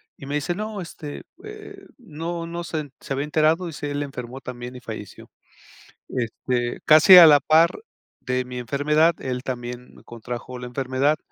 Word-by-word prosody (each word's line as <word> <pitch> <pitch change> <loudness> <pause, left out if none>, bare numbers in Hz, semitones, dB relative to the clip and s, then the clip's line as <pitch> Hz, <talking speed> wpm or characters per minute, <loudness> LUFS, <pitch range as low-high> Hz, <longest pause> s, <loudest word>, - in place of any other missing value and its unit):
Y - - -11
me 145 - -3
dice: 150 +4 -1
"No, 215 +1 -5
este, 160 -3 -8 0.2
eh, 420 -2 -11
¿no 170 - -6
no 170 +1 -5
se 155 -3 -4
se - - -4
había 140 +2 -2
enterado?", 155 +4 +1
dice: 145 -2 -5
"El 145 0 -2
enfermó 130 -2 -7
también 125 0 -8
y - - -8
falleció". 110 -5 -9 0.8
Este, 120 0 -2
casi 155 +5 +9
a 175 - +12
la 145 -2 +7
par 160 +4 +3 0.4
de 125 0 -2
mi 125 0 -7
enfermedad, 150 +6 +2
él 125 -1 -4
también 125 -1 -6
contrajo 120 +2 -7
la 125 - -7
enfermedad 130 +4 0
145 Hz, 165 wpm, -23 LUFS, 125-165 Hz, 0.8 s, a